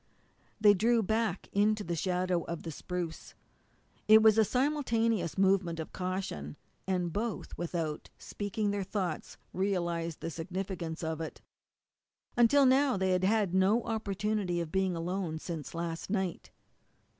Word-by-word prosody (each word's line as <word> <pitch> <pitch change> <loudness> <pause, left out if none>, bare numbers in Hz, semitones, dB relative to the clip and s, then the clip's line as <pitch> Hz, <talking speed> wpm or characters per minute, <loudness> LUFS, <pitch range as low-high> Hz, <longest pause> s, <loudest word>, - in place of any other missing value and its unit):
They 210 -1 +7
drew 225 +3 +3
back 220 -2 -1
into 210 +1 +2
the 170 -2 -2
shadow 180 0 0
of 170 -1 -5
the 165 - -5
spruce. 175 +1 -5 0.7
It 215 0 +8
was 220 0 +6
a - - +7
simultaneous 230 - 0
movement 190 -3 +2
of 160 - -6
caution, 180 - -4 0.3
and 180 -3 0
both, 220 -1 -3
without 165 -3 -3
speaking 205 0 -3
their 205 0 -1
thoughts, 185 -4 -3 0.2
realized 170 -4 -1
the 165 - -3
significance 175 0 -4
of 160 0 -2
it. 160 - -6 1.0
Until 245 +4 +5
now 265 -2 +4
they 190 0 +1
had 185 0 +1
had 205 -2 +2
no 195 +5 +3
opportunity 210 -4 -1
of 165 -2 -4
being 190 -2 +1
alone 170 -1 -2
since 160 -1 -6
last 165 0 -4
night. 190 -4 -2
190 Hz, 140 wpm, -31 LUFS, 170-215 Hz, 1.0 s, It